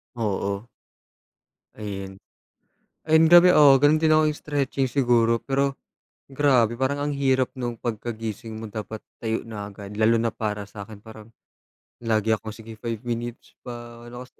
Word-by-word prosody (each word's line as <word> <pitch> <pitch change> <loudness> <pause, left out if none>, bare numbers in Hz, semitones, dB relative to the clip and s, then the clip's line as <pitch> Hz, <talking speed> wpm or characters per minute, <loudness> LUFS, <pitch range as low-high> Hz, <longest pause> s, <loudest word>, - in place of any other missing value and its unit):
Oo. 100 -1 -2 1.1
Ayun. 95 -2 -6 0.9
Ayun 160 +1 +5
grabe, 175 +1 +8
oo, 145 -4 +7
gano'n 145 +3 +4
din 160 -1 +3
ako, 155 - +5
'yong 150 - -7
stretching 140 -2 -1
siguro. 120 -3 +3
Pero, 135 0 0 0.5
grabe 130 -5 +2
parang 140 +2 -1
ang - - -2
hirap 130 -2 +1
no'ng 120 -2 -4
pagkagising 115 -1 -5
mo 110 0 -7
dapat 110 +1 -6 0.2
tayo 110 -1 -2
na 105 -3 -7
agad, 100 0 -10
lalo 110 +1 +4
na 115 - +1
para 105 -2 -4
sa'kin 105 0 -10
parang, 110 0 -13 0.7
lagi 110 -1 +1
akong, 110 0 -8
"Sige, 115 0 -11
5 115 -1 -5
minutes 120 0 -5
pa" 120 -1 -9
ano 120 +1 -9
kasi, - - -34
115 Hz, 150 wpm, -24 LUFS, 110-135 Hz, 1.1 s, grabe